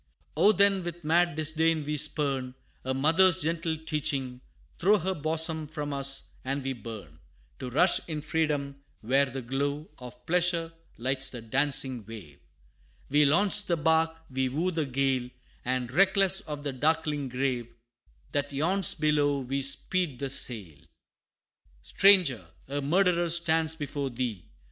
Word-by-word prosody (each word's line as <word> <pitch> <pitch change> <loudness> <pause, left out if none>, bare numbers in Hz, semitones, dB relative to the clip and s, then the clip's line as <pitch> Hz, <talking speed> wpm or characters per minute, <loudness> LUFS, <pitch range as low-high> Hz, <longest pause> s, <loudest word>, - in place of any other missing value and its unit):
Oh, 210 - +5
then 200 -1 +3
with 175 0 -6
mad 170 +1 +2
disdain 160 0 +1
we 150 +1 -2
spurn 135 -3 -1 0.3
A 130 - -2
mother's 165 +7 +4
gentle 165 0 -1
teaching; 140 -5 -2 0.4
throw 205 +5 +4
Her 190 +1 -2
bosom 160 0 0
from 145 -1 -5
us, 135 0 -1
and 135 +1 -3
we 135 0 -2
burn, 105 - -10 0.4
To 125 - -5
rush 165 +9 +4
in 155 -2 -3
freedom, 145 -3 -1 0.2
where 135 +5 +2
the 130 0 -6
glow 140 +5 -3
Of 125 -1 -11
pleasure 170 -1 +1 0.2
lights 130 +2 -1
the 125 - -7
dancing 130 +1 -1
wave: 100 -10 -11 0.7
We 150 +1 +4
launch 200 +7 +3
the 170 - +1
bark, 160 +1 +2 0.2
we 130 0 0
woo 165 +8 -1
the 160 -4 -2
gale, 130 -1 0 0.3
And 125 -1 -2
reckless 190 +3 +3
of 150 -2 -7
the 140 -2 -3
darkling 150 0 0
grave 125 -2 -1 0.6
That 145 0 -1
yawns 170 +6 +1
below, 145 -2 +1
we 135 +2 -2
speed 145 +2 -1
the 135 +1 -3
sail! 105 - -1
XIII. - - -25 0.9
"Stranger! 160 - +4 0.2
a 140 +2 -2
murderer 175 +3 +2
stands 160 -1 +1
before 145 -2 -4
thee! 120 -7 -4
145 Hz, 145 wpm, -28 LUFS, 130-165 Hz, 0.9 s, Oh